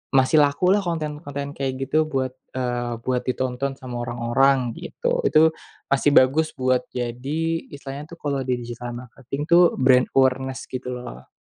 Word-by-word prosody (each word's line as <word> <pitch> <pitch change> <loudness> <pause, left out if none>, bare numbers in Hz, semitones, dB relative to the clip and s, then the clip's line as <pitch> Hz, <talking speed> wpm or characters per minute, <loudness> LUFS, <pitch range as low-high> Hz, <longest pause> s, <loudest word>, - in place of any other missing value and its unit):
masih 135 +4 +4
lakulah 150 +7 +3
konten-konten 150 -3 -4
kayak 135 -2 -3
gitu 155 +4 +1
buat, 135 -4 -1 0.2
eee, 120 -2 -2
buat 125 -1 0
ditonton 130 +1 -2
sama 130 -2 -8
orang-orang 125 +2 +2
gitu. - - -2
Itu 160 +1 +5 0.4
masih 140 +1 +3
bagus 150 +5 +4
buat 130 -1 +1
jadi 125 +5 -3 0.4
istilahnya 140 0 -7
tuh - - -28
kalau 140 -2 -1
di 125 - +2
digital 120 0 -6
marketing 125 +3 -7
tuh 175 0 +6
brand 130 -1 +4
awareness 130 0 +2
gitu 125 0 -4
loh. 125 -1 -9
130 Hz, 145 wpm, -23 LUFS, 125-145 Hz, 0.4 s, tuh